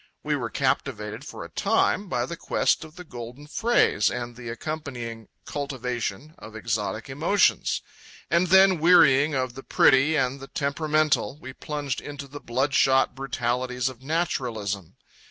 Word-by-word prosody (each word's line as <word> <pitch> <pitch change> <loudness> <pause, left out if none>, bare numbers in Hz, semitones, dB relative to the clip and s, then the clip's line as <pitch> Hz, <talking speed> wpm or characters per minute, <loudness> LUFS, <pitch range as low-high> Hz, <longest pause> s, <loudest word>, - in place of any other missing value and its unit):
We - - 0
were - - -3
captivated 105 +6 -2
for - - -7
a - - -11
time 200 -1 +1
by - - 0
the 170 - -6
quest 165 - +1
of 160 0 -13
the 180 - -9
golden 125 -1 -9
phrase 190 - +2
and 120 -1 -5
the 120 -1 -8
accompanying 120 -5 -6 0.2
cultivation 130 -1 -4
of 110 +1 -11
exotic 110 -1 -2
emotions; 155 +9 +1 0.4
and 170 +2 +2
then, 190 0 +6
wearying 150 -4 +5
of 130 -2 -1
the 135 - -9
pretty 135 +4 +4
and 135 -1 0
the 135 - -9
temperamental, 150 0 0
we 130 -4 -9
plunged 145 -2 -4
into 145 -1 -8
the 145 +2 -10
bloodshot 130 +1 +2
brutalities 125 -1 -2
of 130 -1 -12
naturalism. 120 - -2
135 Hz, 145 wpm, -25 LUFS, 120-155 Hz, 0.4 s, then